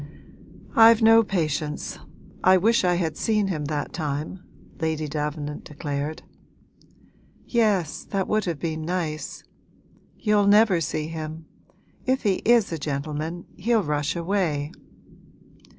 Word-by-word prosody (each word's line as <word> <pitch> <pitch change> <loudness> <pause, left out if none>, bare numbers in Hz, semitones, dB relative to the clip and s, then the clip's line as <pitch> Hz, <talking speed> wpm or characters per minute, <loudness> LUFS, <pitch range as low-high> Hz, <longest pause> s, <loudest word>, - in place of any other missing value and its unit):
'I've 225 0 +7
no 225 +1 +7
patience 155 -7 -2 0.4
I 185 0 +6
wish 225 +5 +3
I 180 -1 +3
had 165 -3 -1
seen 210 -3 +1
him 155 -5 -2
that 145 -1 -3
time!' 150 +2 -3 0.4
Lady 160 -2 -1
Davenant 150 0 -4
declared. 145 +1 -4 1.2
'Yes, 210 - +1
that 195 -2 -2
would 215 -1 +1
have 170 -4 -2
been 160 0 -3
nice! 160 -2 -3 0.7
You'll 210 -2 +2
never 205 -4 +5
see 155 0 -2
him; 160 0 -6 0.6
if 260 +1 0
he 200 -4 +1
is 235 -4 +4
a 165 - -3
gentleman 155 +4 -4
he'll 225 +2 +2
rush 150 0 -1
away.' 170 -5 -1
165 Hz, 120 wpm, -24 LUFS, 150-200 Hz, 1.2 s, I've